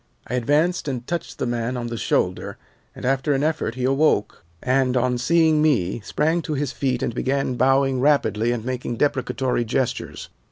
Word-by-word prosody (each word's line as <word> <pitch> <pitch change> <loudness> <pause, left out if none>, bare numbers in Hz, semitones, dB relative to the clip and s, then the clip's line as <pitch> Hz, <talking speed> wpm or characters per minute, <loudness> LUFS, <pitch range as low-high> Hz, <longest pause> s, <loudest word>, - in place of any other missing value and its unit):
"I - - -7
advanced 150 +8 +1
and 125 -3 -3
touched 170 +3 -4
the - - -2
man 120 +1 -2
on 120 - -4
the 120 0 -4
shoulder, - - -1 0.4
and - - -7
after 135 +3 +1
an 135 +1 0
effort 155 -7 -1
he 130 - -4
awoke, 135 - +1 0.2
and, 130 0 +2
on 125 0 +1
seeing 160 +3 +3
me, 120 - +1
sprang 160 - 0
to 155 -2 -3
his 140 -1 -2
feet 130 -3 -1
and - - -1
began 130 +1 -1
bowing 135 +1 +2
rapidly 120 -5 +2
and 120 -2 -3
making 125 -1 -3
deprecatory 130 -2 0
gestures. 120 +2 -3
130 Hz, 175 wpm, -22 LUFS, 120-145 Hz, 0.4 s, seeing